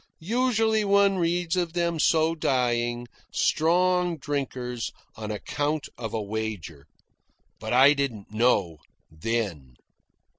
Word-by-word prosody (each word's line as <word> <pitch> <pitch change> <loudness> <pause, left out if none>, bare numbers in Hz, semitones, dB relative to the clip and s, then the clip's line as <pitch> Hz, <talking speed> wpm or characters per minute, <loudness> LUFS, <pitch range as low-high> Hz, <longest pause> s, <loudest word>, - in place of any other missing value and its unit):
Usually 225 +2 +1
one 200 -1 +3
reads 175 0 0
of 175 -2 -1
them 170 -2 0
so 160 +1 +3
dying, 120 -5 0 0.2
strong 180 +1 +2
drinkers, 130 -5 -3 0.2
on 110 -1 -6
account 145 +8 -2
of 115 -3 -6
a 110 - -2
wager. 100 -9 -5 0.7
But 110 - -5
I 135 +4 +7
didn't 130 -9 -3
know 105 -8 +1 0.3
then. 80 - -3
135 Hz, 110 wpm, -26 LUFS, 110-170 Hz, 0.7 s, I